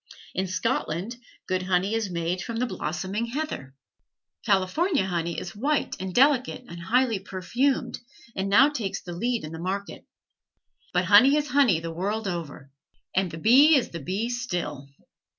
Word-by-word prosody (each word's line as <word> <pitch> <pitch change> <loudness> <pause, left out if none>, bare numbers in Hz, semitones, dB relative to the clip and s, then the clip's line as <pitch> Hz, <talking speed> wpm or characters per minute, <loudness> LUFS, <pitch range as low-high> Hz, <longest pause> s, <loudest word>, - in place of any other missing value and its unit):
In 190 +1 -1
Scotland 185 +3 -2 0.3
good 185 0 0
honey 185 +2 0
is 225 -3 -1
made 175 +1 -2
from 230 - -5
the 240 +2 0
blossoming 195 +2 -3
heather. 235 - -5 0.7
California 210 - +1
honey 170 -2 -2
is 175 - -8
white 280 +7 0
and 190 0 -4
delicate 255 +2 +2
and 170 - -9
highly 230 +3 +2
perfumed, 220 +9 -1 0.4
and 190 +1 -2
now 265 +8 +6
takes 205 -9 -3
the 175 - -7
lead 235 +6 -1
in 155 - -7
the 160 - -7
market. 195 +3 -5 0.8
But 180 0 +1
honey 215 +10 +7
is 295 -1 -1
honey 250 - +4
the 165 0 -6
world 205 +5 -2
over; 150 -6 -6 0.4
and 190 -1 +2
the 160 - -8
bee 265 - +6
is 265 - +1
the 170 - -6
bee 195 - -2
still. 175 - -4
195 Hz, 160 wpm, -26 LUFS, 175-245 Hz, 0.8 s, honey